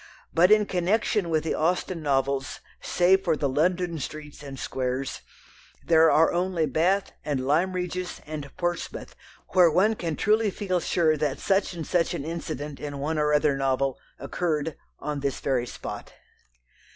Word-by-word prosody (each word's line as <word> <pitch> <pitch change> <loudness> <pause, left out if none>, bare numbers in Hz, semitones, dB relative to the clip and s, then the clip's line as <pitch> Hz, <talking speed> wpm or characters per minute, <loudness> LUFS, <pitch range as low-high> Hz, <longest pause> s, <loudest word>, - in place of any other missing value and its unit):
But 175 +2 +5
in 215 -1 +6
connection 195 +1 0
with 155 -1 +1
the 160 - -1
Austen 175 +1 0
novels, 135 -2 0 0.2
save 190 +2 +3
for 165 -5 +1
the 145 - 0
London 170 +4 0
streets 150 +1 -7
and 140 -2 -8
squares, 130 +1 -3 0.6
there 160 -1 +6
are 160 +1 +4
only 175 -2 +1
Bath 175 +8 +1
and 135 -4 -2
Lyme 165 +7 +2
Regis 180 0 -3
and 150 -2 -6
Portsmouth 175 -1 -3 0.3
where 180 -2 +6
one 190 +7 +3
can 170 -7 -3
truly 215 +4 +2
feel 185 -2 -1
sure 165 -2 +2
that 145 -2 -1
such 195 -2 0
or 165 - -3
such 170 +1 0
an 140 - -4
incident 155 -3 -5
in 145 -1 -5
one 155 +3 -1
or 150 0 +2
other 150 -1 +3
novel 135 -1 0 0.2
"occurred" 160 -3 -2 0.2
on 150 -1 -4
this 140 -1 -2
very 125 -3 0
spot. - - -7
160 Hz, 160 wpm, -26 LUFS, 145-180 Hz, 0.6 s, in